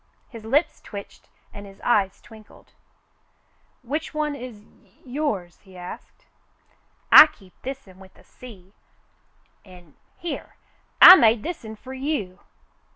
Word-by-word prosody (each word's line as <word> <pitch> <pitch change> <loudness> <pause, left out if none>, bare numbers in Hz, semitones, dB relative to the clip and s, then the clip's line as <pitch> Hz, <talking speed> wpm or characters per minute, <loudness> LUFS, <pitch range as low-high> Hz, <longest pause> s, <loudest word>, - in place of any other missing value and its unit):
His 230 -3 -12
lips 290 +8 0
twitched 200 -2 -12 0.2
and 205 0 -11
his 195 0 -16
eyes 200 -5 0
twinkled. 220 -2 -18 1.1
"Which 300 +5 -5
one 300 -1 -2
is 245 -6 -10
y 200 -2 -29
— - - -29
yours 245 - -4
.'^" - - -35
he 190 -2 -17
asked. 180 0 -12 0.9
"I 310 - +10
keep 195 -11 -21
this'n 255 -8 -9
with 190 -1 -17
the - - -21
sea 200 -6 -16 0.5
— - - -41
an' 180 -6 -18
— - - -41
here, 340 -1 -7 0.4
I 370 - +11
made 225 -4 +3
this'n 235 -11 -7
fer 260 +4 -11
you." 260 -9 -4
220 Hz, 145 wpm, -23 LUFS, 195-275 Hz, 1.1 s, I